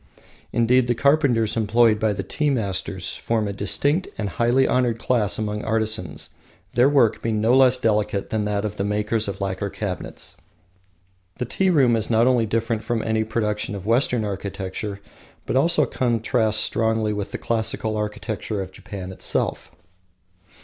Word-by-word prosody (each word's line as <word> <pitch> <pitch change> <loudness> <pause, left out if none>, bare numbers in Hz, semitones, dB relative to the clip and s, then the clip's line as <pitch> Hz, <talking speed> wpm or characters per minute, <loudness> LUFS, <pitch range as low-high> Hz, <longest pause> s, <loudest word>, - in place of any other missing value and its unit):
Indeed, 120 +2 +3
the 120 - +1
carpenters 140 -6 +2
employed 115 0 +3
by 110 -1 +2
the 95 -1 -3
tea 150 +10 -1
masters 100 -9 -2
form 110 -2 -1
a 100 - -3
distinct 145 - 0
and 105 -2 -2
highly 120 +8 +2
honoured 120 -3 +1
class 115 -3 0
among 105 -1 -3
artisans, 110 -8 -1 0.4
their 125 +3 +4
work 135 -6 +3
being 110 -2 -1
no 115 +4 +3
less 130 -1 +5
delicate 105 -4 0
than 110 -1 0
that 105 0 -1
of 105 0 -4
the 100 - -1
makers 105 +2 0
of 100 - -5
lacquer 100 +1 -2
cabinets. 95 -4 -6 1.0
The 125 - -2
tea 190 +10 +1
room 135 -9 +4
is 110 -1 -1
not 115 0 +4
only 125 -3 +3
different 115 0 -1
from 115 0 -1
any 110 0 +1
production 105 -2 -2
of 95 -1 -7
Western 115 0 +1
architecture, 100 0 -5 0.5
but - - -2
also 165 +6 +3
contrasts 115 -2 +1
strongly 110 0 +1
with 105 -1 -4
the - - -3
classical 110 -1 -1
architecture 105 0 -3
of 95 -1 -5
Japan 95 -1 -8
itself. 95 - -2
110 Hz, 160 wpm, -23 LUFS, 105-120 Hz, 1.0 s, less